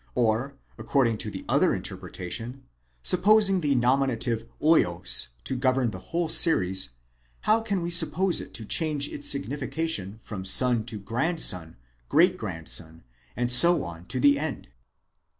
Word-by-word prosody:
or, 120 +4 0 0.2
according 125 -5 +1
to - - -4
the - - -9
other - - +2
interpretation, 115 +9 -6 0.4
supposing 195 0 +4
the 145 -3 0
nominative 120 -2 0
vids 90 - +2 0.2
to 130 - -2
govern 130 -2 0
the - - -8
whole 170 0 -1
series, 95 - +2 0.5
how 220 +1 +2
can 200 -5 -3
we 170 - -3
suppose 180 +2 +1
it - - -11
to 110 - -8
change 150 +3 +2
its 145 0 0
s - - -1
ignification 135 - -3
from 100 -4 -7
soa 125 +6 +4
to 110 +1 -4
o - - -11
grandson, 115 - -2 0.3
great 180 +4 +4
grandson, 80 - -6 0.3
and 120 0 -1
so 170 - +6
on 85 -1 -9
to 130 - -4
the 140 +1 +4
end? 155 -1 -6
130 Hz, 150 wpm, -25 LUFS, 110-160 Hz, 0.5 s, so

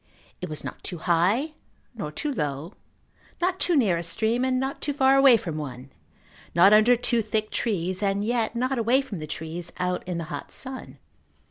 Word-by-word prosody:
It - - -4
was 155 - -4
not - - -7
too 175 - -4
high 185 - +1 0.4
nor 175 -11 -5
too 290 - -3
low, 150 - -3 0.7
not 365 +1 0
too 350 - +2
near 210 - +3
a - - -2
stream 220 +8 0
and 260 -1 +1
not 265 +1 -3
too 290 - -1
far 270 -1 +4
away 270 -3 +7
from 165 -7 -5
one, 135 -3 -7 0.6
not 190 +4 +7
under 215 +4 +6
too 235 0 +1
thick 215 0 -2
trees 185 -4 -1
and 200 0 0
yet 235 0 0
not 255 +2 0
away 245 +4 +3
from 210 -10 -7
the 155 - -6
trees 160 +3 -5
out 180 0 -1
in 180 -2 -2
the 170 - -3
hot 145 - -6
sun. 260 0 -7
215 Hz, 195 wpm, -25 LUFS, 170-255 Hz, 0.7 s, away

